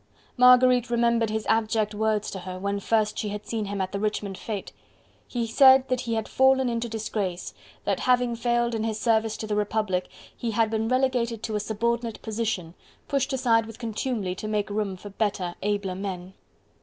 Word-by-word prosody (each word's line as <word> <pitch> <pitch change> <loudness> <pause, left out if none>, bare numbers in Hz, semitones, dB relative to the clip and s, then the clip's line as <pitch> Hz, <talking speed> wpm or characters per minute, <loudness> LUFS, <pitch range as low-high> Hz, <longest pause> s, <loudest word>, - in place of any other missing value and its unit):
Marguerite 250 -1 +6
remembered 235 -1 +2
his 220 0 -2
abject 220 -1 +1
words 215 0 0
to 190 - -5
her, 185 0 -7
when 200 +2 -2
first 215 +1 +1
she 210 - -2
had 210 +1 -6
seen 220 -2 -2
him 200 0 -4
at 190 0 -2
the 200 - -3
Richmond 210 -2 -2
fete: 205 0 -5 0.6
he 240 -2 -2
said 265 +3 +6
that 255 -1 0
he 230 -2 -2
had 220 -1 -2
fallen 265 -1 +3
into 235 0 -2
disgrace, 210 -5 -3 0.3
that, - - 0
having 250 -1 +2
failed 240 0 0
in 220 -1 -1
his 220 -1 -2
service 220 -2 +1
to - - -5
the 210 -1 -2
Republic, 210 -3 -1 0.3
he 235 - -3
had 225 0 +1
been 220 0 0
relegated 245 -3 0
to 220 - -3
a - - +1
subordinate 230 +2 -2
position, 215 -6 -2 0.3
pushed 275 -1 0
aside 235 -4 +2
with 225 - -10
contumely 225 -4 -2
to 200 +3 -6
make 210 -1 -1
room 205 -2 -2
for 205 +2 -10
better, 195 -4 -1
abler 205 -2 -1
men. 185 -1 -5
220 Hz, 190 wpm, -26 LUFS, 205-235 Hz, 0.6 s, Marguerite